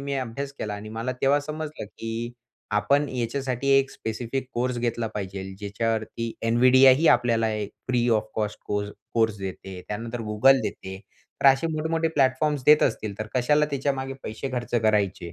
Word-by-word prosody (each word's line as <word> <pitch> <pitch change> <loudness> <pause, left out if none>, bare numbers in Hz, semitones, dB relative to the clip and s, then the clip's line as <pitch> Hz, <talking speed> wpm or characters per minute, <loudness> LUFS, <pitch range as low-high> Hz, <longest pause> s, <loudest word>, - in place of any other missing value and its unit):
मी 140 0 -3
अभ्यास 135 +2 -4
केला 105 -1 -3
आणि 105 +1 -8
मला 115 +3 -3
तेव्हा 140 +2 +4
समजलं, 155 -2 -6
की 115 +3 -5 0.4
आपण 140 +8 +2
याच्यासाठी 130 +2 -2
एक 135 0 0
स्पेसिफिक 120 +4 -4
कोर्स 125 0 -1
घेतला 120 -1 -1
पाहिजे 95 -1 -4
ज्याच्यावरती 110 +2 -2
NVIDIA 130 +3 +6
ही 165 - +2
आपल्याला 115 -2 +3 0.4
free 120 -1 +2
of 110 -1 +2
cost 105 -1 -2
course 105 0 -2 0.2
course 110 -2 +2
देते. 95 -1 -7
त्यानंतर 115 +3 -4
Google 135 +6 +5
देते. 95 0 -5 0.4
तर - - +4
असे 135 +4 +5
मोठे-मोठे 160 +1 0
प्लॅटफॉर्म्स 140 -1 +1
देत 150 0 +7
असतील 110 -4 -2
तर 110 - -3
कशाला 150 +4 +3
त्याच्यामागे 135 -1 -2
पैसे 110 +5 -5
खर्च 120 -1 -3
करायचे? 100 -5 +1
120 Hz, 155 wpm, -25 LUFS, 110-135 Hz, 0.4 s, देत